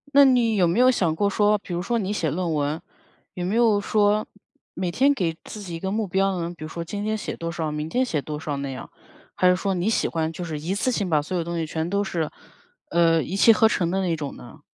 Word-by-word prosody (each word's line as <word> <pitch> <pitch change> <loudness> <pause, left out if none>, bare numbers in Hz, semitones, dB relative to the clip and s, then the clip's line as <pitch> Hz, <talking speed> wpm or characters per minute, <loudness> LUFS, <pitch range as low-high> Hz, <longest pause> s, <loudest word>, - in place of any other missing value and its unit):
那 280 - +9
你 245 -4 +4
有 185 -3 +4
没 170 +8 +1
有 255 0 +6
想 175 -10 +2
过 200 +5 +1
说 210 +1 +3
比 195 -3 -8
如 175 - -1
说 235 +4 0
你 200 +1 -2
写 165 -7 0
论 170 -1 -1
文， 150 +2 -1 0.5
有 180 -1 -4
没 195 - -1
有 225 -3 +3
说 210 +1 +2 0.5
每 180 -1 -2
天 275 +10 +3
给 170 -10 -1
自 215 - -9
己 175 -4 -6
一 - - -5
个 190 +1 -3
目 215 -1 -1
标 190 0 +1
呢？ 170 +1 -3
比 155 - -9
如 155 - -6
说 170 - -6
今 205 +4 -4
天 215 0 -1
写 - - -5
多 165 0 -4
少， 160 -2 -3
明 150 +1 -4
天 255 +5 +1
写 155 - -1
多 150 +1 -5
少 150 -2 -3
那 140 0 -4
样。 130 - -8 0.5
还 180 - +4
是 180 - +4
说 195 0 -1
你 180 +4 0
喜 - - +1
欢 160 -1 -1
就 175 +2 -6
是 155 -2 -4
一 165 +6 -3
次 230 +5 0
性 205 -7 -1
把 150 -2 +3
所 180 +5 -5
有 170 - 0
东 170 0 -4
西 160 -1 -2
全 160 +2 -3
都 200 +1 +1
是， 170 -6 -2 0.6
呃， 165 -1 +4
一 185 - -4
气 225 +3 +7
呵 220 0 +5
成 175 -5 0
的 190 - 0
那 175 -3 0
种 145 -3 -6
呢？ 120 +4 -13
180 Hz, 295 characters per minute, -24 LUFS, 160-205 Hz, 0.6 s, 那